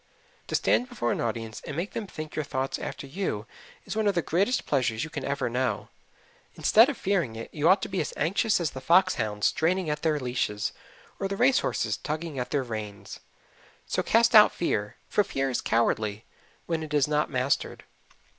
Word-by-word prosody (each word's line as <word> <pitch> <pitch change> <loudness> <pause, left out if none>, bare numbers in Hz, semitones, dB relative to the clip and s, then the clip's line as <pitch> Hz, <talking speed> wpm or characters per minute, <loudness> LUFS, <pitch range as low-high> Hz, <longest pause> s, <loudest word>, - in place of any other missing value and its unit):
To - - -2
stand 250 - +2
before 215 - -1
an - - -1
audience 115 -1 -3
and 145 - -6
make 180 +5 -2
them 220 -3 -4
think 155 -3 -8
your 155 - -1
thoughts 135 -1 -3
after - - -6
you 135 - -3 0.4
is - - -5
one 220 -1 +1
of 200 - +2
the 170 - +1
greatest 200 +10 +1
pleasures 120 -5 0
you 155 - -6
can 140 - -5
ever 140 - -1
know. 120 -2 -1 0.7
Instead 225 +5 +5
of 285 - -3
fearing 175 - 0
it, 115 - -8
you 155 +2 +2
ought 190 +1 +5
to - - -2
be 190 -1 -1
as 150 - -3
anxious 200 +7 +2
as 165 -4 -1
the 130 - -8
fox 175 +7 +4
hounds 105 -1 -2
straining 175 0 +1
at 150 - -3
their 155 -2 +1
leashes, 120 -5 -1 0.5
or 195 - -1
the 195 0 -4
race 255 +3 +4
horses - - -1
tugging 155 -2 -4
at 125 - -3
their 140 -2 0
reins. 105 -4 -7 0.7
So - - -1
cast 230 +1 +3
out 210 -1 +9
fear, 105 -11 -2
for 205 - +2
fear 135 -7 -2
is 125 - -1
cowardly 110 -2 0 0.4
when 165 -1 -1
it 155 -1 -4
is 145 -1 +3
not 150 0 +1
mastered. 130 0 -1
150 Hz, 200 wpm, -27 LUFS, 120-190 Hz, 0.7 s, out